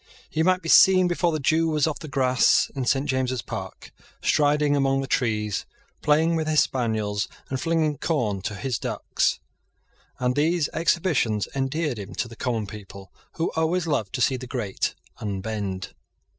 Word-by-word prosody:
He 160 - 0
might 185 +2 +2
be - - -5
seen, 185 +1 +7
before 175 0 +1
the 155 - -1
dew 160 +4 +2
was 155 -2 +2
off 155 -2 -2
the 155 - -8
grass 130 -3 +3
in 135 -2 -3
St. 135 +3 +1
James's 130 -3 -1
Park, - - -7 0.3
striding 150 -1 +2
among 135 -1 +2
the - - -3
trees, 105 -6 -1 0.3
playing 160 +3 +3
with 160 -1 -1
his 155 -1 +3
spaniels, 110 -5 -1 0.2
and 130 -1 -2
flinging 160 -3 0
corn 115 - -1
to 105 +2 -4
his 125 +1 -2
ducks; - - -1 0.8
and 125 0 0
these 155 +1 +1
exhibitions 160 - +1
endeared 135 -1 -1
him 100 -3 -8
to 120 - -2
the 115 - -11
common 115 -2 -2
people, 100 -2 -11 0.2
who 165 - -1
always 160 +2 +1
love 140 - -1
to 130 - -2
See 130 +1 +2
the 130 0 -8
great 120 -6 -2 0.2
unbend. 100 -1 -4
135 Hz, 170 wpm, -25 LUFS, 110-155 Hz, 0.8 s, seen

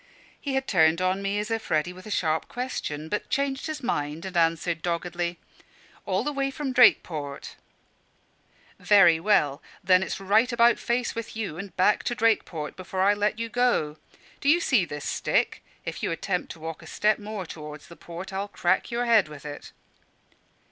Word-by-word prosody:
He 275 -2 -2
had 265 0 0
turned 160 -3 +4
on 185 +1 0
me 200 +1 -1
as 210 +2 -3
if 225 0 -3
ready 155 +3 +1
with 185 +3 -12
a - - -7
sharp 160 -6 0
question, 160 - -4
but 210 - -3
changed 275 +1 -1
his 310 -3 -5
mind 150 -5 -2
and 190 -1 -7
answered 165 0 +1
doggedly 175 0 -2 0.7
"All - - +1
the 295 - -1
way 275 -1 0
from 275 -1 -4
Drakeport." 155 - +3 1.2
"Very 175 -6 +6
well; 160 -7 +2 0.2
then 185 0 +5
it's 190 - -3
right 215 +6 +3
about 235 0 +4
face 240 +1 -1
with 230 -1 -6
you 200 -7 -4
and 195 0 -8
back 190 +3 +3
to 240 - -1
Drakeport 210 -9 0
before 185 0 -4
I 200 +1 +5
let 205 +1 0
you 230 0 -3
go. 230 -11 +1 0.4
Do 280 - +1
you 335 +3 +6
see 250 - +2
this 150 -2 -7
stick? - - 0 0.2
If - - -5
you - - -1
attempt 180 +2 -2
to 165 - -16
walk 160 0 -6
a - - -12
step 215 +1 +1
more 210 -2 -5
towards 150 -2 -9
the 170 - -12
port, 175 +4 -9
I'll 195 +1 -2
crack 185 -2 0
your 240 0 -1
head 225 -7 +4
with 150 -1 -11
it." 145 -1 -8
190 Hz, 185 wpm, -26 LUFS, 165-230 Hz, 1.2 s, Very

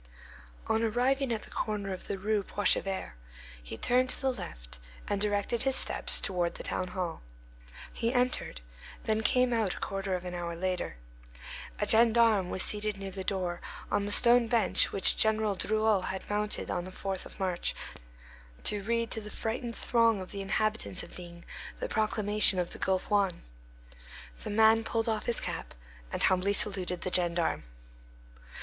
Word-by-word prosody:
On 220 0 0
arriving 250 +4 +1
at 220 -2 -2
the - - -11
corner 205 -3 -3
of 185 - -9
the 200 - -3
Rue 210 +2 0
Poichevert, 195 -1 0 0.5
he - - -8
turned 255 - +2
to - - +2
the 265 -1 0
left, - - -9 0.3
and 200 -1 -2
directed 205 +3 0
his 265 0 +2
steps - - +3
toward 175 -3 -2
the - - -7
town 185 - -3
hall. 180 -2 -4 0.7
He 230 - -1
entered, 250 - -1 0.4
then 220 0 0
came 250 +3 +2
out 220 -5 0
a - - -9
quarter 195 -1 -3
of 180 0 -6
an 180 - -5
hour 170 -1 -4
later. 180 - -3 0.8
A - - +1
gendarme 225 -4 +4
was 185 - +3
seated 210 -1 0
near 195 -1 -6
the 190 0 -6
door, 185 -3 -3 0.3
on 205 - 0
the - - -1
stone 240 +1 +7
bench 230 -1 +1
which 195 - +4
General 220 -1 +3
Drouot 215 -1 +1
had 190 0 -5
mounted 210 0 -1
on 175 - -2
the 185 - -8
4th 190 0 -5
of - - -16
March 185 -2 -1 0.9
to 205 - +4
read 230 +2 -1
to 220 - 0
the 210 - -9
frightened 230 +2 -4
throng 230 -3 +2
of 185 - -8
the 200 - -5
inhabitants 215 -1 -1
of - - -12
D—— 170 -1 -11 0.4
the - - -3
proclamation 210 -2 +3
of 180 -1 -2
the - - -8
Gulf 190 +2 -1
Juan. 195 -4 +1 1.0
The - - -6
man 220 +1 +4
pulled 225 +1 -1
off 220 -2 -1
his 235 - +2
cap - - -5 0.4
and - - -2
humbly 185 +2 +2
saluted 185 -3 +2
the 185 - -3
gendarme. 175 -2 +1
205 Hz, 170 wpm, -29 LUFS, 185-225 Hz, 1.0 s, stone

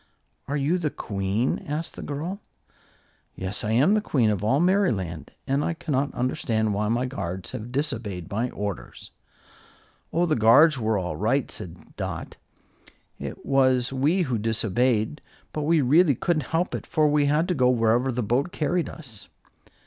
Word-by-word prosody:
"Are 145 - -1
you 150 +6 +1
the 160 -3 0
Queen?" 100 +1 -2
asked 150 +3 -4
the - - -7
girl. 160 +7 -4 1.0
"Yes, 95 +2 -3
I 105 - 0
am 190 - +4
Queen 120 - +2
of 105 -1 -2
all 130 +7 +2
Merryland; 115 - +1 0.2
and 140 +2 0
I 170 - -1
cannot 140 -3 -2
understand 110 -3 0
why 105 +1 0
my 120 +3 +1
guards 95 -8 -5
have 120 -1 -6
disobeyed 110 - -3
my 115 +5 -1
orders." 100 -5 -6 1.0
"Oh, 170 +2 +2
the 155 -3 +1
guards 130 +7 +6
were 110 -1 +1
all 90 -4 -3
right," 120 - 0
said 85 -1 -8
Dot. - - -5 0.8
"It - - -7
was 130 -2 +2
we 150 +8 +2
who 125 -7 -1
disobeyed. 115 +4 0 0.3
But 155 - -2
we 165 -2 +4
really 145 +3 +4
couldn't 155 +1 -1
help 170 +3 0
it, - - -5
for 155 -2 +2
we 145 -1 +3
had 150 +4 +2
to - - +2
go 130 -6 +3
wherever 120 +2 +2
the 125 0 -2
boat 125 - 0
carried 170 +1 -1
us." 125 -10 -8
130 Hz, 165 wpm, -25 LUFS, 110-150 Hz, 1.0 s, guards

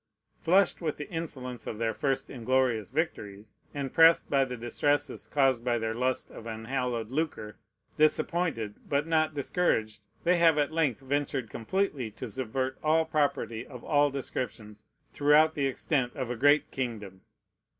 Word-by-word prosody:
Flushed 185 +3 +3
with 155 -3 -2
the 150 - -6
insolence 130 -8 -6
of 110 - -4
their 115 0 -1
first 135 -2 -1
inglorious 125 -3 0
victories, 105 -8 -4
and 140 -2 -4
pressed 165 0 +5
by 140 -1 +4
the 125 -2 -5
distresses 145 +4 -1
caused 135 -4 +2
by 120 -1 +1
their 110 -1 -2
lust 125 +2 -1
of 115 - -10
unhallowed 115 0 -3
lucre, 135 -8 -3 0.4
disappointed, 155 -7 +1 0.2
but 145 +1 +1
not 155 -1 +1
discouraged, 130 -8 0 0.2
they 180 +1 +3
have 165 -2 +5
at 145 0 +1
length 150 -7 0
ventured 135 -3 -2
completely 135 - -2
to 125 +4 -7
subvert 130 +3 -3
all 160 +1 +3
property 140 -7 -1
of 125 -4 -10
all 145 -1 +3
descriptions 110 -6 -6 0.3
throughout 150 +2 +4
the 140 -3 0
extent 130 -1 0
of 130 -3 -3
a - - -2
great 145 +5 +3
kingdom. 105 -7 -5
135 Hz, 150 wpm, -29 LUFS, 115-150 Hz, 0.4 s, pressed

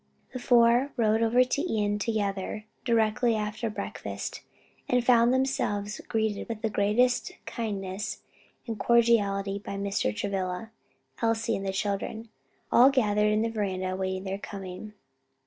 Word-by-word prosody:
The 255 - -4
four 245 +2 +4
rode 220 -1 +2
over 235 +2 +4
to 255 +3 -1 0.2
Ion 205 0 0
together, 205 -1 -2 0.2
directly 230 0 +2
after 215 +2 -2
breakfast, 215 - -5 0.5
and 250 -1 +2
found 240 -1 +5
themselves 210 -6 -1
greeted 220 -1 -1
with 225 -1 -5
the 220 - 0
greatest 215 +5 +2
kindness 200 -3 -4 0.4
and 225 -3 -5
cordiality 205 -4 +2
by 200 - -6
Mr. 200 - -1
Travilla, 195 - -3 0.5
Elsie 230 0 +1
and 195 0 -4
the - - 0
children, 205 +3 -3 0.4
all 250 +3 +7
gathered 210 -5 +2
in 215 +1 +2
the 230 - 0
veranda 190 -4 -2
awaiting 190 0 -2
their 195 0 -4
coming. 195 +1 -8
215 Hz, 135 wpm, -28 LUFS, 200-235 Hz, 0.5 s, all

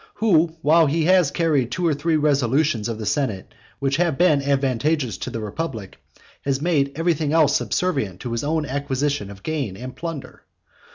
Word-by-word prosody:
who, 185 -7 +3 0.2
while 160 +2 +5
he 155 +2 0
has 180 -4 +4
carried 145 -7 +1
two 180 +5 -2
or 165 - +3
three 155 +3 0
resolutions 140 -5 +1
of 115 - -3
the 110 - -6
senate 105 -5 -2 0.2
which 135 0 0
have 170 -5 +1
been 160 -5 +4
advantageous 140 - 0
to 110 - -5
the 120 -2 -5
republic, 110 - -5 0.4
has 135 -1 0
made 145 -4 +1
everything 160 -2 0
else 155 -3 +4
subservient 135 - -1
to 120 - -5
his 115 0 -2
own 155 +1 0
acquisition 140 -3 -2
of 100 -1 -12
gain 140 -12 -3
and 125 +3 -8
plunder? 165 -4 -7
145 Hz, 175 wpm, -22 LUFS, 125-160 Hz, 0.4 s, while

